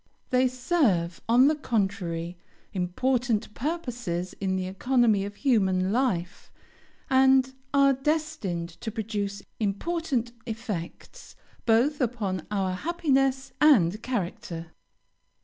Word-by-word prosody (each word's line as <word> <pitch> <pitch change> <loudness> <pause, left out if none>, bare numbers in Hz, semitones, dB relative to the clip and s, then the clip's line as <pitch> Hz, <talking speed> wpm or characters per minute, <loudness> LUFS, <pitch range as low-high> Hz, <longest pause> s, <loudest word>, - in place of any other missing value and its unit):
They 255 0 +4
serve, 245 - +1
on 250 +3 +6
the 305 - +4
contrary, 195 - -2 0.4
important 225 +4 0
purposes 240 - -3
in 190 -1 0
the 185 -1 -1
economy 220 +1 +2
of 205 0 -7
human 190 -7 +2
life, 200 -8 -1 0.6
and 265 0 +4 0.2
are 275 -1 +5
destined 270 - -2
to 225 - -3
produce 205 -2 -3 0.2
important 240 - -1 0.2
effects 215 -7 -6 0.3
both 255 +6 +3
upon 210 -8 -2
our 195 -3 0
happiness 270 - 0
and 215 - +5
character. 175 -8 -4
225 Hz, 100 wpm, -27 LUFS, 190-265 Hz, 0.6 s, on